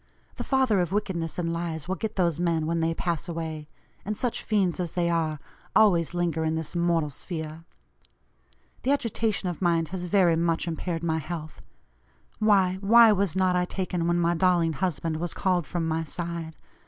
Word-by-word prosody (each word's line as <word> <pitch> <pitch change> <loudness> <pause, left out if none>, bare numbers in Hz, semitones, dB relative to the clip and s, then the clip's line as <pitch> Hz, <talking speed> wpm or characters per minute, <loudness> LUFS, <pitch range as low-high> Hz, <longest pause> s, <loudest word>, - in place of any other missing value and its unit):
The - - -3
father 260 -7 +2
of 175 -1 0
wickedness 185 -6 -2
and 165 -1 -1
lies 165 -2 -4
will 185 - -1
get 220 +2 -4
those 170 -4 +1
men 165 -3 +1
when 165 +1 0
they 165 0 0
'pass 170 -1 -2
away;' 160 -2 -5 0.4
and 210 +1 -3
such 245 -2 -2
fiends 195 -5 0
as 175 -3 -2
they 170 -1 +1
are, 160 -3 0 0.4
always 175 -7 +4
linger 170 -2 0
in 160 0 0
this 160 +1 -5
mortal 170 -3 +1
sphere. 160 +1 -6 1.2
The - - -2
agitation 225 -7 -1
of 175 -1 -4
mind 170 -3 +2
has 180 -1 -4
very 180 -3 +4
much 165 0 0
impaired 165 0 -3
my 160 -1 0
health. 155 0 -7 0.8
Why, 195 -4 +3
why 225 +2 +7
was 200 -4 +1
not 185 -1 +2
I 180 0 +2
taken 180 -2 -2
when 175 0 +2
my 170 0 +2
darling 175 -2 +2
husband 160 -1 -2
was 175 +1 -4
called 180 -5 0
from 170 -2 -2
my 160 0 0
side? 165 0 -5
170 Hz, 180 wpm, -26 LUFS, 165-185 Hz, 1.2 s, why